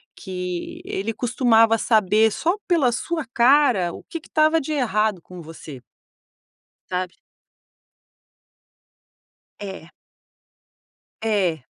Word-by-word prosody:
que 180 -2 -6
ele 200 +4 -3
costumava 230 -1 +3
saber 215 0 +3
só 340 - 0
pela 315 -9 +3
sua 320 +5 -3
cara 245 -8 +4
o - - -10
que 330 - -7
que 320 - -19
estava 310 +1 +3
de 305 +2 -4
errado 215 - 0
com 180 -1 -11
você. 155 -4 -11 1.1
Sabe? 180 0 -3 2.5
É. 190 -4 -8 1.3
É. 190 - 0
220 Hz, 95 wpm, -22 LUFS, 185-265 Hz, 2.5 s, cara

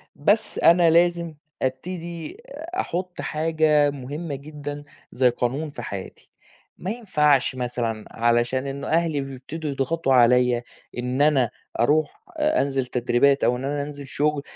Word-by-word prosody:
بس 205 +9 +1
أنا 170 0 +6
لازم 170 0 +3 0.3
أبتدي 170 - -4 0.4
أحُطّ 180 - -3
حاجة 155 -2 +2
مهمة 145 +3 -5
جدًا، 145 0 -7 0.3
زي 125 0 +3
قانون 130 +6 -2
في - - -8
حياتي، 95 -2 -8 0.5
ما 185 - -4
ينفعش 150 - +2
مثلًا، 120 -3 -3
علشان 120 +3 +1
إن 140 +1 -5
أهلي 160 -3 +1
بيبتدوا 135 +4 -6
يضغطوا 135 +1 0
عليَّ 125 0 +4 0.3
إن 125 +3 -1
أنا 135 -6 +4 0.3
أرُوح 150 - +1
أ 305 +1 +2
أنزل 135 -2 -1
تدريبات، 125 +3 +2
أو 125 - +3
إن 130 - -6
أنا 145 +1 -1
أنزل 145 -1 -8
شغل، 150 +1 0
145 Hz, 130 wpm, -24 LUFS, 125-160 Hz, 0.5 s, أنا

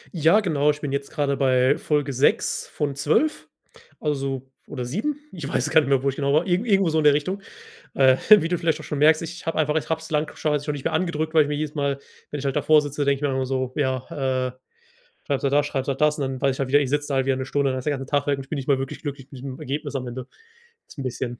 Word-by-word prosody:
Ja, 165 +7 +4
genau. 150 -7 +1
Ich 150 0 +1
bin 145 -3 -4
jetzt 140 0 -3
grade 145 -3 0
bei 130 0 +3
Folge 145 -2 0
6 130 +3 +1
von 145 -3 -3
12. 155 - 0 0.5
Also 135 -3 -2 0.2
oder 125 -3 -5
7, 235 - -2
ich 165 -6 -6
weiß 150 +2 -1
gar 160 - +6
nicht 140 - -3
mehr, 135 -1 +2
wo 140 - +2
ich 135 - -4
genau 140 -1 0
war, 155 +4 +3
irgend 190 +6 0
irgendwo 195 -3 +3
so 160 0 +1
in 155 - 0
der 150 - +6
Richtung. 185 +7 -2 0.5
Äh, 130 -1 +5
wie 205 -6 +8
du 175 - +1
vielleicht 160 -2 0
auch - - -9
schon 145 - -4
merkst: 155 +1 +5
Ich 170 +2 -7
habe 165 - -1
einfach 150 0 +1
ich 160 - -1
habe 160 - 0
es 160 - -11
lang 150 0 -1
schon 150 -1 -1 0.2
nicht 145 -2 -6
mehr - - -1
angedrückt, 160 -2 -1
weil 155 - +7
ich 145 - -2
mir 150 - -1
jedes 150 0 -3
Mal, 140 -2 -1 0.3
wenn 150 - -4
ich 140 - -6
halt 135 - -1
davor 150 +1 +5
sitze, 145 0 -3
denke 140 0 +2
ich 135 - -12
dann 135 - -1
immer 130 -1 -1
so: 130 -1 -2
„Ja, 130 -3 +1 0.5
äh, - - -9 0.7
schreibst 140 -2 -1
halt 140 - +1
das, 145 0 +3
schreibst 135 -2 -3
halt 135 -1 -2
das.“ 150 0 +3
Und - - -1
dann 135 -1 -3
weiß 135 -2 +2
ich - - -11
halt 135 - -1
wieder: 145 +2 +5
Ich 135 -3 -1
sitze 145 0 0
da 140 - -1
halt 135 0 +1
wieder 135 - +2
'ne 130 0 -4
Stunde, 140 0 +1
dann 130 - -2
ist 130 - -7
der 145 -2 +1
ganze 135 0 -7
Tag 145 -1 +1
weg 145 - +1
und 135 - -7
ich 135 - -25
bin 155 - -2
nicht 135 - -6
mal 140 - +4
wirklich 135 0 -5
glücklich 140 -3 -6
mit 130 - -9
diesem 130 -1 -7
Ergebnis 145 +1 -4
am 130 -1 -4
Ende. 125 +1 -6 0.6
Das - - -15
ist - - -27
'n 140 - -4
bisschen 125 -1 -4
145 Hz, 295 wpm, -24 LUFS, 135-155 Hz, 0.7 s, wie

